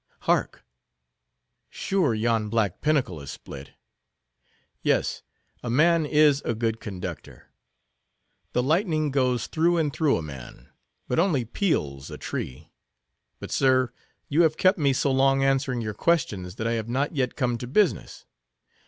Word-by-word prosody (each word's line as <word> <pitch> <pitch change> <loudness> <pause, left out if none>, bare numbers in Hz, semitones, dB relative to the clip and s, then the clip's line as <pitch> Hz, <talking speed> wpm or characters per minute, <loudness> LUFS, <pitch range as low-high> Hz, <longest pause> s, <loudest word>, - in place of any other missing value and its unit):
Hark! - - 0 1.0
Sure, 180 - 0
yon 110 -1 0
black 105 -5 0
pinnacle 140 - 0
is 70 - -9
split. 70 +1 -10 1.1
Yes, - - 0 0.4
a 120 - -5
man 160 +5 +3
is 150 -1 +4
a 120 - -1
good 115 0 -1
conductor. 90 -7 -8 1.0
The 125 - +1
lightning 155 - +1
goes 125 -3 +1
through 170 +2 +1
and 150 -4 0
through 155 -4 +2
a 80 - -4
man, 65 -4 -10 0.4
but 125 - 0
only 160 -9 +2
peels 70 - -1
a - - -7
tree. 75 +5 -6 0.7
But - - -8
sir, 130 -2 +3 0.4
you 150 +4 +2
have 160 -2 +3
kept 185 0 +3
me 140 -2 +3
so 135 +1 +1
long 135 +1 +3
answering 135 -2 +1
your 110 -1 -3
questions, 105 - 0
that 110 - -4
I 115 - +1
have 115 -1 -2
not 140 +6 -1
yet 130 -3 -1
come 120 -3 -1
to 125 - -6
business. 190 - 0
130 Hz, 145 wpm, -25 LUFS, 110-150 Hz, 1.1 s, is